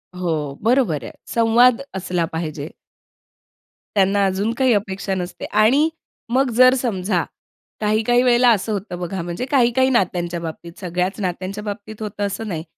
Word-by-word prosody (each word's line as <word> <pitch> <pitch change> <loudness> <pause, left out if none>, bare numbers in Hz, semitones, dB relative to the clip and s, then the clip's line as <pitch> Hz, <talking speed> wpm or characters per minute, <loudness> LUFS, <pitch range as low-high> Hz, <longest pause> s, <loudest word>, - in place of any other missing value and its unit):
हो, 160 -6 -2
बरोबर 225 - +2
आहे. - - -7 0.2
संवाद 235 +2 +4
असला 180 -2 -1
पाहिजे. 155 -3 -4 1.3
त्यांना 200 0 +3
अजून 195 +4 0
काही 260 -2 +3
अपेक्षा 195 -1 -2
नसते 180 -1 -5
आणि, 245 +9 +3 0.4
मग 260 +2 +2
जर 255 +1 +7
समजा, 195 -8 -1 0.6
काही-काही 220 +3 +2
वेळेला 245 0 +5
असं 220 0 0
होतं 195 -3 -5
बघा, 180 +1 -4
म्हणजे 175 +7 -4
काही-काही 260 -1 +3
नात्यांच्या 175 -7 0
बाबतीत, 170 +1 -7
सगळ्याच 180 +2 -2
नात्यांच्या 185 +2 -3
बाबतीत 210 +1 -7
होतं 205 -1 -3
असं 215 +3 -5
नाही. 165 -6 -4
200 Hz, 140 wpm, -21 LUFS, 180-235 Hz, 1.3 s, जर